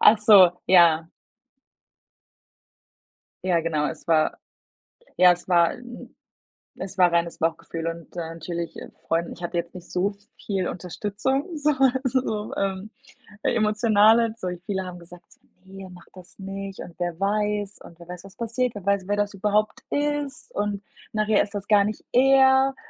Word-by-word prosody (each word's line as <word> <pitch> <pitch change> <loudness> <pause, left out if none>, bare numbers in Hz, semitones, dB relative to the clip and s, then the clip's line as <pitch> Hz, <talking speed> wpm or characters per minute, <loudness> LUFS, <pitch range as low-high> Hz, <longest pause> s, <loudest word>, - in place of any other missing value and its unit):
Ach 220 - +7
so, 200 -5 +8 0.2
ja. 165 -3 +5 2.4
Ja, 175 -2 +2
genau, 155 -2 -1
es 160 - -9
war 160 -2 +2 0.8
ja, 180 0 +7
es 175 - -12
war, 170 -2 +4
äh, - - -10
'n 245 -1 -11 0.7
es 190 +1 -7
war 180 -2 +5
reines 170 0 0
Bauchgefühl 165 0 -3
und, 165 0 -7
äh, - - -1
natürlich, 170 0 -5
äh, - - -9 0.2
Freunden 165 +1 0
ich - - -14
hatte 175 0 -3
jetzt 170 0 -3
nicht 180 -1 -11
so 195 +3 0 0.3
viel 190 -3 -1
Unterstützung, 205 - -3
so, 295 0 +1 0.3
also, 260 0 +1
so, 215 -4 -4
ähm, 195 +1 -2 0.5
emotionale. 220 +1 +3
So 185 -6 -4 0.2
viele 190 -2 -3
haben 180 -1 -8
gesagt: 175 0 -14 0.4
„Ne, 190 0 -11
mach 180 -1 -14
das 185 -1 -15
nicht“ 195 0 -7
und 170 - -10
„wer 175 -2 -3
weiß” 205 0 -1
und 170 - -14
„wer 170 - -13
weiß 180 +1 -9
was 195 0 -14
passiert? 235 +1 -2
Wer 200 -3 -8
weiß 200 -2 0
wer 205 - +1
das 205 0 -1
überhaupt 210 +2 0
ist 290 -1 -2
und 205 -1 -2 0.3
nachher 215 -1 +2
ist 200 - -10
das 205 0 -5
gar 205 -2 +5
nicht 210 0 -4
er.” 265 +1 +5
195 Hz, 160 wpm, -24 LUFS, 175-215 Hz, 2.4 s, so